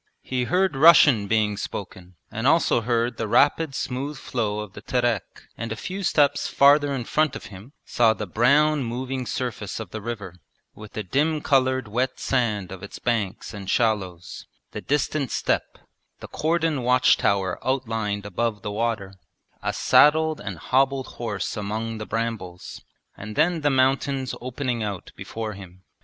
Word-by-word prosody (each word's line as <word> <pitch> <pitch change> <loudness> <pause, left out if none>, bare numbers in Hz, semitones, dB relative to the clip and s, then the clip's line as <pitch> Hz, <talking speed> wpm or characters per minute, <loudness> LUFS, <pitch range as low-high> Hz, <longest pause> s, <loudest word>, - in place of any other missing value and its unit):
He 125 -1 -1
heard 185 +2 +1
Russian 145 -8 +6
being 105 -1 +1
spoken, 90 -2 -7 0.2
and 115 +3 -1
also 160 -6 +3
heard 120 +1 0
the 115 - -2
rapid 145 +5 +3
smooth 140 +4 -3
flow 110 -5 -2
of 105 -2 -9
the 100 - -10
Terek, 120 -4 -2
and 115 0 -5
a - - -2
few 185 - -5
steps 145 -5 +2
farther 145 +1 +5
in 135 -3 -2
front 155 +3 +1
of - - -8
him 100 +9 -12
saw 115 -2 +3
the 105 - -4
brown 140 - +3
moving 125 +1 -4
surface 115 -6 -4
of 105 -6 -7
the 110 - -6
river, 105 -6 -6 0.4
with 105 -1 -12
the 110 - -4
dim 150 - +1
coloured 130 -4 +1
wet 125 +5 -1
sand 110 -8 -1
of 95 -1 -8
its 100 - -9
banks 115 -4 -2
and 100 -2 -7
shallows, 95 -7 -1 0.2
the - - -6
distant 145 -1 -1
steppe, - - -1 0.4
the - - -9
cordon 160 -2 0
watch 125 +1 +4
tower 95 -2 0
outlined 115 -6 -2
above 105 +2 -2
the 105 - -3
water, 105 -3 -2 0.5
a - - -1
saddled 155 +1 +4
and 100 -3 -5
hobbled 135 +6 +1 0.2
horse 105 -5 -3
among 110 +2 -4
the 110 - -6
brambles, 110 -6 -4 0.3
and 105 +1 -8
then 165 +1 +2
the 145 - +2
mountains 135 0 +1
opening 125 -1 -3
out 100 -4 -5
before 110 -1 -5
him. 95 -2 -13
120 Hz, 160 wpm, -24 LUFS, 105-135 Hz, 0.5 s, Russian